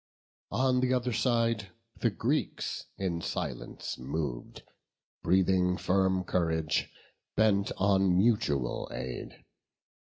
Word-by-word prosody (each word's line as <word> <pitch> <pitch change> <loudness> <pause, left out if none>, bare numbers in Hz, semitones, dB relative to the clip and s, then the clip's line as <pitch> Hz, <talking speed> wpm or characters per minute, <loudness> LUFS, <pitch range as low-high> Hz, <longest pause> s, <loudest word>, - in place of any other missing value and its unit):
On 130 0 +2
th' 130 0 +2
other 125 -1 +1
side 115 -4 +1 0.3
the - - +2
Greeks - - -2
in 90 -3 -2
silence - - -4
mov'd, 65 -1 -4 0.6
Breathing 90 0 +3
firm 95 -1 +2
courage, 80 -4 0 0.5
bent 100 -2 +3
on 95 -2 +3
mutual 90 - +1
aid. 65 -1 -6
95 Hz, 95 wpm, -30 LUFS, 85-110 Hz, 0.6 s, Breathing